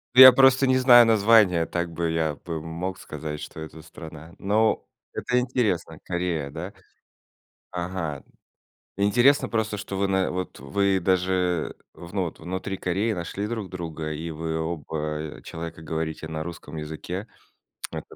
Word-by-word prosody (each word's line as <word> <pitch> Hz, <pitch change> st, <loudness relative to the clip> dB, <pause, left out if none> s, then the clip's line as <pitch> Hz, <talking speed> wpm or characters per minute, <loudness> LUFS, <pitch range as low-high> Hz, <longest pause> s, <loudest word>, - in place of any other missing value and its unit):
Ну, 130 Hz, -, +10 dB
я 130 Hz, 0 st, +13 dB
просто 135 Hz, +1 st, +5 dB
не 130 Hz, 0 st, +4 dB
знаю 120 Hz, -2 st, +8 dB
названия, 105 Hz, -6 st, +5 dB
так 85 Hz, -1 st, -3 dB
бы 85 Hz, 0 st, -1 dB
я 80 Hz, -2 st, 0 dB
бы 80 Hz, -2 st, -4 dB
мог 85 Hz, +4 st, -5 dB
сказать, 75 Hz, 0 st, -6 dB
что -, -, -8 dB
это 80 Hz, 0 st, -8 dB
страна. 80 Hz, +2 st, -11 dB
Но 110 Hz, +3 st, +2 dB, 0.3 s
это 125 Hz, 0 st, -1 dB
интересно. 125 Hz, -8 st, 0 dB
Корея, 85 Hz, -5 st, -2 dB
да? 85 Hz, +5 st, -6 dB, 1.0 s
Ага. 85 Hz, -5 st, -4 dB, 0.7 s
Интересно 120 Hz, +8 st, +4 dB
просто, 110 Hz, -2 st, -1 dB
что 100 Hz, -1 st, -5 dB
вы 100 Hz, 0 st, +1 dB
на 95 Hz, -1 st, +1 dB
вот 90 Hz, -6 st, -4 dB
э, -, -, -13 dB
вы 95 Hz, +6 st, +1 dB
даже 90 Hz, -2 st, +1 dB, 0.2 s
вну 90 Hz, +2 st, -3 dB
вот 80 Hz, -, -7 dB
внутри 95 Hz, +3 st, -4 dB
Кореи 100 Hz, +6 st, 0 dB
нашли 95 Hz, +3 st, -4 dB
друг 110 Hz, -5 st, -4 dB
друга, 80 Hz, -3 st, -5 dB
и 80 Hz, +2 st, -5 dB
вы 80 Hz, +1 st, -3 dB
оба, 80 Hz, -1 st, -4 dB, 0.4 s
э, -, -, -18 dB
человека 80 Hz, 0 st, -7 dB
говорите 80 Hz, 0 st, -4 dB
на 80 Hz, 0 st, -4 dB
русском 85 Hz, -2 st, -8 dB
языке. 80 Hz, +7 st, -5 dB, 0.6 s
Это -, -, -8 dB
90 Hz, 155 wpm, -25 LUFS, 80-100 Hz, 1.0 s, я